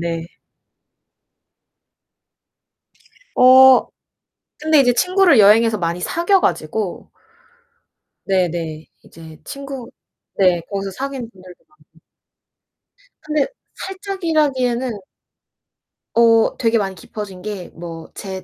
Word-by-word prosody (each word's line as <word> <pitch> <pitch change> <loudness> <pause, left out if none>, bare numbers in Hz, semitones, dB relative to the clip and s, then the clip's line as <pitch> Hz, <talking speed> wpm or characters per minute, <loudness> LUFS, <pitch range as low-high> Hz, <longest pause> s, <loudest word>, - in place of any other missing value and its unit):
네네. 170 0 -5 3.0
어 260 0 +7 0.7
근데 310 -1 +3
이제 245 -2 +4
친구를 365 - +3
여행에서 215 +1 +5
많이 170 0 -2
사귀어 345 - +1
가지고 180 +5 -3 1.1
네네. 170 -4 -2 0.2
이제 160 -1 -14
친구 275 -3 -8 0.5
네 180 -3 +3
거기서 195 -1 -4
사귄 265 +3 -5
분들도 185 -3 -16
많아요. 305 - -28 1.2
근데 305 -2 0 0.3
살짝이라기에는 300 - -2 1.2
어 230 -1 +4
되게 230 -1 +1
많이 195 -3 -2
깊어진 195 +1 -9
게 200 -3 -6
뭐 165 -1 -9
제 190 -2 -7
225 Hz, 195 characters per minute, -19 LUFS, 180-275 Hz, 3.0 s, 어